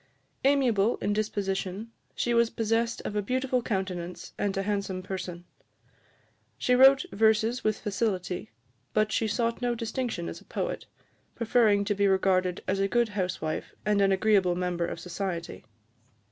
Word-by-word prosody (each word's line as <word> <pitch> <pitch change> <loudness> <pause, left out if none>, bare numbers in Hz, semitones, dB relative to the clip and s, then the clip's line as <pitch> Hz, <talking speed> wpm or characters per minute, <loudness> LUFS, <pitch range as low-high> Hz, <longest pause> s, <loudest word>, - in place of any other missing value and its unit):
Amiable 245 -6 +3
in 205 - -1
disposition, 205 0 -2 0.2
she 240 - 0
was 235 -1 +4
possessed 230 +1 0
of 210 - -4
a 210 - +1
beautiful 255 +3 0
countenance 185 -5 -4
and 200 -1 -1
a 195 - 0
handsome 200 -2 -2
person. 180 -2 -6 1.1
She 250 - +1
wrote 270 +4 +7
verses 220 +3 +2
with 215 -1 +1
facility, 195 -4 -2 0.5
but 215 0 +2
she 220 - +1
sought 230 +3 -1
no 245 -1 0
distinction 230 -5 -3
as - - -7
a - - -19
poet, - - -4 0.5
preferring 220 -3 +3
to 205 - +1
be 200 0 +2
regarded 185 -2 +2
as 195 +1 0
a 195 - +2
good 235 +2 +2
housewife 185 -6 -3
and 205 -1 +2
an 195 0 +4
agreeable 190 -2 +3
member 175 -1 -1
of - - -5
society. 175 0 -5
205 Hz, 150 wpm, -28 LUFS, 190-230 Hz, 1.1 s, wrote